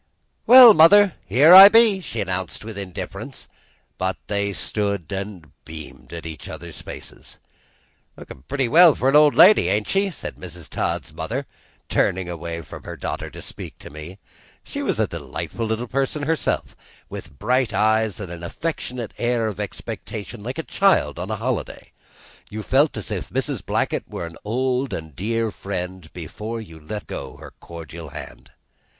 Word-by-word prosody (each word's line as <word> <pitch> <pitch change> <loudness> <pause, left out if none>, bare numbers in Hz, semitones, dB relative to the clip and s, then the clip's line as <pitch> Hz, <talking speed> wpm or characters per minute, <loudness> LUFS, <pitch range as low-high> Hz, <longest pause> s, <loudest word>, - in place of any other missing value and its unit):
"Well, 245 -2 +11
mother, 195 +3 +7
here 150 +7 +6
I 195 +2 +13
be!" 225 -3 +5
she 115 - -4
announced 95 +1 -4
with 110 -1 -7
indifference; 95 -3 -7 0.5
but 95 -2 -1
they 100 -1 -1
stood 100 -1 -3
and 95 -5 -6
beamed 75 -5 -11
in 85 -1 -7
each 80 -1 -8
other's - - -9
faces. - - -10 0.8
"Lookin' - - -11
pretty 135 -2 0
well 165 +2 +7
for 130 - +1
an 135 - +2
old 150 -1 +6
lady, 205 +4 +7
ain't 105 +1 0
she?" 195 +1 +1
said 180 - -7
Mrs. 90 -2 -10
Todd's - - -3
mother, - - -4 0.4
turning 95 -1 0
away 85 -1 -5
from - - -10
her - - -8
daughter - - -4
to - - -11
speak - - -9
to - - -12
me. 75 +5 -9 0.5
She - - -6
was - - -1
a - - +3
delightful 115 -1 -5
little 110 +2 -2
person 135 +4 -2
herself, 160 +2 -1 0.3
with 70 - -9
bright 125 - +1
eyes 110 0 +1
and 95 -4 -7
an 85 -1 -8
affectionate 125 - -5
air 120 -1 +1
of 105 -4 -4
expectation 110 +1 -6
like 125 +5 -6
a 160 - -3
child 170 - +2
on 90 +3 -5
a 110 - -1
holiday. 120 +2 -4 0.6
You 110 +1 -6
felt 140 +2 +2
as 105 - -6
if - - -4
Mrs. - - -3
Blackett - - -2
were - - -5
an 85 0 -10
old 130 +4 -1
and 80 -3 -7
dear 115 - -1
friend 90 -4 -6
before 105 +7 -6
you 80 -8 -11
let 100 +7 -7
go - - -7
her - - -12
cordial 85 -1 -9
hand. 70 -1 -10
105 Hz, 170 wpm, -22 LUFS, 90-130 Hz, 0.8 s, I